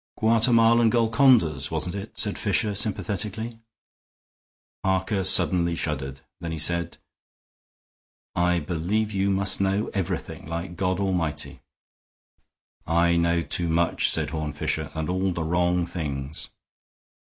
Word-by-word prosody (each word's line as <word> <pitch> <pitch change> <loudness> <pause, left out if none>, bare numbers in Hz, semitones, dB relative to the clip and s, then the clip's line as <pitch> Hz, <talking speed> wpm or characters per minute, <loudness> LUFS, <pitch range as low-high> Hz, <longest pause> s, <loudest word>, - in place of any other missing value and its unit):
"Guatemalan 115 +1 +4
Golcondas, 115 - +3
wasn't 90 - -3
it?" 100 +2 -7
said 105 -2 +1
Fisher, 105 0 0
sympathetically. 110 +2 -2 1.2
Harker 95 +1 0
suddenly 85 -1 +4
shuddered. 70 -4 -4 0.2
Then 85 - -5
he 80 - -4
said, 85 +2 +1 1.4
"I 90 0 +1
believe 90 +8 -2
you 100 -1 0
must 95 0 +2
know 100 +3 0
everything, 95 -5 -4
like 85 +2 -5
God 95 -1 -1
Almighty." 85 -7 -2 1.3
"I 85 +1 +2
know 85 0 +2
too 85 0 0
much," 85 +1 +1
said - - -1
Horne 75 -2 -4
Fisher, 75 - -2
"and 80 -1 -3
all 95 +1 -1
the 85 - -3
wrong 85 +1 +1
things." 75 -4 -4
90 Hz, 120 wpm, -25 LUFS, 85-100 Hz, 1.4 s, Guatemalan